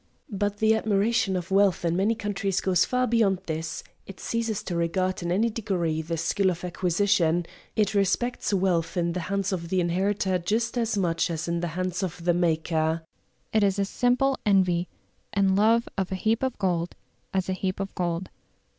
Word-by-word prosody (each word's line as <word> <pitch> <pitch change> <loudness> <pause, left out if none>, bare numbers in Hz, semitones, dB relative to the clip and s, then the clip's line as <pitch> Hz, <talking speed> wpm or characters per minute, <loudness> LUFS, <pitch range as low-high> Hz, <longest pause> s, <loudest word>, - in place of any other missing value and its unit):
But 205 0 -1
the 220 +1 +4
admiration 215 -1 +1
of 180 0 -4
wealth 195 -2 +3
in 170 0 +1
many 205 +5 +2
countries 200 -3 -1
goes 180 -2 +2
far 250 0 +1
beyond 215 -6 +2
this; 160 0 -4 0.2
it 195 - -10
ceases 225 -2 -2
to 175 - -4
regard 185 +3 0
in 175 0 -2
any 220 +6 +2
degree 180 -8 -1
the 165 +1 -3
skill 190 +4 +1
of 175 -1 -4
acquisition; 175 -1 +1 0.3
it 215 0 +1
respects 205 +6 0
wealth 185 -4 +1
in 170 -1 +1
the 180 - -2
hands 195 -1 0
of 170 -2 -4
the 185 - +1
inheritor 185 +2 +1
just 220 +7 -1
as 230 -3 0
much 170 -4 +1
as 165 0 -3
in 170 0 0
the 175 - -2
hands 185 0 -1
of 175 -2 -4
the 175 - +4
maker; 160 -1 0 0.5
it 215 -1 +4
is 200 -1 +2
a 200 - +1
simple 250 +5 +1
envy 185 -4 +2 0.5
and 195 -1 +3
love 225 +3 +3
of 190 -1 -2
a - - 0
heap 220 +4 0
of 260 -2 -1
gold 175 -3 -1 0.4
as 190 -1 -1
a 190 - 0
heap 185 0 -3
of 195 0 -4
gold. 175 0 -2
190 Hz, 190 wpm, -26 LUFS, 175-205 Hz, 0.5 s, the